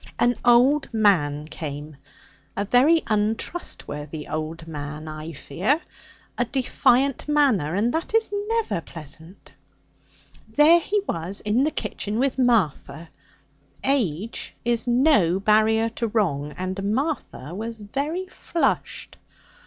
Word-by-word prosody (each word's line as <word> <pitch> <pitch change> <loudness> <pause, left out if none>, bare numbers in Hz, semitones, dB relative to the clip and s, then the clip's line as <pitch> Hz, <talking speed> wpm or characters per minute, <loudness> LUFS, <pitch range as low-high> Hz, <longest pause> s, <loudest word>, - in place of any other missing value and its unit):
'An 240 0 +3
old 250 +4 +4
man 165 -10 +2
came. 150 -1 -7 0.6
A 200 - 0
very 280 +10 +4
untrustworthy 205 - -3
old 160 +1 -5
man, 150 0 -6
I 155 +1 -6
fear. 180 - -1 0.6
A 245 - +3
defiant 260 +2 +1
manner, 260 - +2
and 225 +5 +1
that 335 +7 -2
is 445 -2 +2
never 455 - 0
pleasant. 160 +3 -10 1.0
There 300 +9 +6
he 410 +5 0
was 170 +5 -2
in 225 +6 +2
the - - +2
kitchen 215 -8 -3
with 265 +1 0
Martha! 170 - +1 0.7
Age 225 - -1
is 235 0 +1
no 240 - +4
barrier 220 +2 +3
to 230 +1 -3
wrong, 165 -10 0
and 195 +3 -2
Martha 270 - -3
was 225 +3 -5
very 285 - -3
flushed. 345 -2 -2
215 Hz, 115 wpm, -24 LUFS, 165-265 Hz, 1.0 s, There